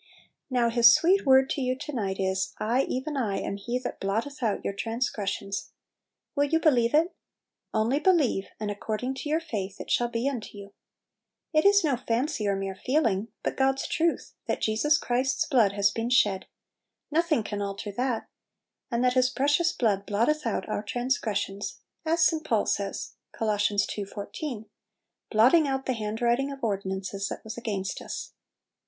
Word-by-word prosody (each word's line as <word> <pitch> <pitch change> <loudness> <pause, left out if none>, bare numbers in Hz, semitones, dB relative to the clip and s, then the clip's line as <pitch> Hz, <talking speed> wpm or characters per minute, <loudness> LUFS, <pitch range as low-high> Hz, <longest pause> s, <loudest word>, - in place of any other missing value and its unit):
Now 240 -3 +2
His 235 0 +8
sweet 370 0 +3
word 265 0 +6
to 280 - -1
you 255 0 0
to 300 - -6
night 195 -6 -2
is, 190 0 -1
"I, 240 +5 +1
even 285 +4 -3
I, 215 -8 0
am 200 - -3
He 240 +5 -2
that 255 - -5
blotteth 225 +9 -2
out 220 -4 -1
your - - -1
transgressions." 200 -3 -3 0.6
Will 285 0 +3
you 320 +3 +2
believe 255 -5 +3
it? 330 +4 +3 0.6
"Only 230 +6 +1
believe," 305 - +2
and 210 -1 -2
"according 220 +5 -3
to 270 +3 -6
your 315 +2 +2
faith 210 - -5
it - - -6
shall 240 - +3
be 235 +2 -2
unto 240 -6 -4
you." 200 0 -10 0.8
It 310 +2 +3
is 405 -1 +5
no 280 -5 +2
fancy 240 -1 -1
or 200 - +2
mere 195 0 -3
feeling, 225 -3 0 0.2
but - - -1
God's 270 0 +1
truth, 335 +1 0
that - - 0
Jesus 260 +8 +2
Christ's 255 +1 0
blood 230 -9 +3
has 200 0 +3
been 230 +1 -2
shed, 205 -6 +3 0.3
— - - -58
nothing 315 -5 +2
can 205 -1 -4
alter 200 +1 -4
that; 245 +2 -2 0.6
and 240 -1 0
that 250 0 +3
His 255 0 +3
precious 290 +7 +2
blood 200 - 0
blotteth 235 +8 +1
out 225 - -2
our - - -2
transgressions; 210 -4 -2 0.3
as 330 +1 +4
St. 320 -1 +2
Paul 225 -8 +1
says 195 -1 -3 0.2
(CoL 215 -2 0 0.4
ii. 205 - -3
14), 215 +4 -6 0.6
"Blotting 255 +8 +5
out 270 -1 -2
the 260 - 0
handwrit 230 +2 0
ing 275 +1 -1
of 275 -2 -9
ordinances 195 -1 -2
that - - -6
was 220 +1 -7
against 205 -5 -3
us." - - -6
235 Hz, 175 wpm, -27 LUFS, 205-275 Hz, 0.8 s, His